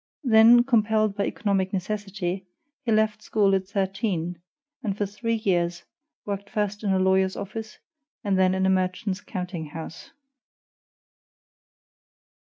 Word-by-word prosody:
Then, 235 0 +7
compelled 220 -4 +2
by 200 -1 0
economic 195 -3 0
necessity, 195 -1 -3 0.4
he 235 - -1
left 215 0 +2
school 205 -2 +2
at 190 -1 0
thirteen, 190 -4 -2 0.4
and 205 -5 -2
for 205 - 0
three 230 +3 -2
years 175 -5 0 0.4
worked 200 0 -4
first 210 0 -2
in 200 - +1
a 190 - +3
lawyer's 190 0 +2
office, 215 +2 -6 0.5
and 200 -3 +1
then 185 0 +3
in 190 0 +1
a - - +3
merchant's 185 +1 -1
counting 180 -4 -5
house. 160 +2 -8
195 Hz, 130 wpm, -25 LUFS, 185-215 Hz, 0.5 s, Then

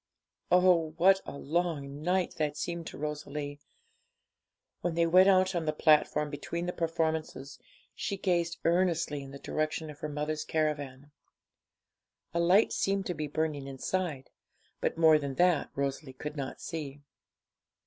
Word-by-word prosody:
Oh, 180 -3 +4
what 190 +2 +5
a - - -6
long 150 -3 -2
night 180 +2 +1
that 150 -1 -1
seemed 170 0 -4
to - - -8
Rosalie! 145 -1 -5 1.2
When 175 -1 -2
they 170 0 +3
went 185 +3 +6
out 185 0 +4
on 170 -2 -1
the 155 - +1
platform 150 -1 +3
between 170 +4 -4
the 180 - -2
performances, 160 -4 -2 0.3
she 200 - -3
gazed 170 -3 0
earnestly 170 -4 +1
in 135 - -9
the 140 - -9
direction 155 +2 -2
of 150 - -14
her 155 - -4
mother's 150 +1 -2
caravan. 145 -3 -2 1.2
A 170 - 0
light 180 +5 +4
seemed 195 0 0
to 180 - -2
be 155 -2 -4
burning 150 -2 -2
inside, 140 +1 -3 0.5
but - - -1
more 160 -2 +6
than 140 -2 -4
that 175 -1 +3
Rosalie 140 0 -3
could 150 +3 -6
not 135 -3 -5
see. 145 -4 -6
155 Hz, 150 wpm, -30 LUFS, 145-175 Hz, 1.2 s, went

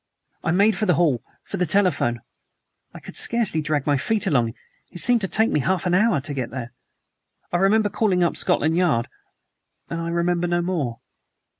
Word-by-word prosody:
I - - -1
made 200 +5 +3
for 215 +3 -1
the 180 - +4
hall, 145 -9 +1 0.2
for - - -5
the 180 - +1
telephone. 165 - +1 0.7
I - - -11
could - - -11
scarcely 225 -9 +1
drag 150 -2 -1
my 145 -1 +2
feet 210 - -1
along. 120 -10 +1 0.3
It - - -11
seemed 240 +5 +3
to 190 - +1
take 220 +4 +2
me - - +2
half 185 +5 0
an 180 - +1
hour 210 -3 +3
to 145 +2 -4
get 130 -3 -3
there. 125 -1 -7 0.8
I - - +3
remember 205 +3 +3
calling 195 -5 +1
up 170 - +1
Scotland 160 +2 +1
Yard, 155 -10 +1 0.8
and 165 0 -3
I 165 - -3
remember 170 +1 0
no 175 0 0
more." 150 -10 -2
175 Hz, 190 wpm, -23 LUFS, 145-195 Hz, 0.8 s, the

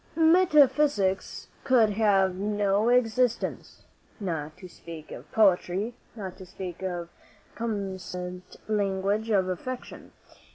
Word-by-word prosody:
Metaphysics 295 - +3 0.2
could 235 -5 +4
have 200 -3 +3
no 205 +2 +1
existence, 245 0 0 0.4
not 160 -6 -4
to 185 - -10
speak 165 -2 -11
of - - -10
poetry, 200 +1 +2 0.2
not 190 -5 -7
to 190 - -10
speak 180 -1 -7
of 175 -2 -3
the - - -29
commonest 185 -4 -5
language 205 +1 0
of 195 -4 +2
affection. 245 +8 -6
200 Hz, 110 wpm, -27 LUFS, 185-225 Hz, 0.4 s, could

